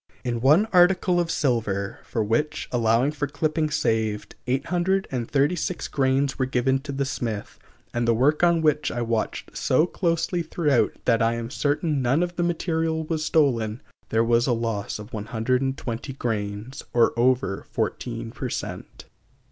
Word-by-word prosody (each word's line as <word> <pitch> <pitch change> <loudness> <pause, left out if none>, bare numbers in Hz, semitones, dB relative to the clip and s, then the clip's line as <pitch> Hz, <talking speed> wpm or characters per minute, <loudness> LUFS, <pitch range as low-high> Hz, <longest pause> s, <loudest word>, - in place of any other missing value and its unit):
In 120 -2 -2
one 150 - +5
article 180 0 +4
of 170 -1 0
silver, 110 -10 -1
for 110 - -1
which, 150 +8 -1
allowing 120 +3 +2
for 145 -1 -2
clippings 155 +1 -1
saved, 110 -2 -1
836 155 +1 0
grains 135 0 +1
were 130 - +1
given 130 +1 +1
to 140 +1 -7
the 140 0 -1
smith, 115 -6 -4 0.3
and 120 0 0
the 115 - +5
work 145 +6 +3
on 170 -2 +4
which 150 -1 +2
I 120 - -2
watched 115 -1 -2
so 155 +5 +3
closely 175 0 0
throughout 150 -7 +1
that 115 -1 +3
I 115 +1 +2
am 115 +1 -5
certain 145 0 0
none 130 +7 +2
of 175 0 -4
the 175 - -1
material 165 -2 0
was 155 0 -2
stolen, 120 -9 +1 0.3
there 115 0 +2
was 120 +1 +3
a 125 - +3
loss 115 -3 -2
of 105 0 -11
120 120 +3 -2
grains, 110 -1 -4
or 120 -1 +4
over 120 -4 +1
14 115 -2 -3
per 130 +1 -5
cent. - - -6
130 Hz, 155 wpm, -24 LUFS, 115-155 Hz, 0.3 s, one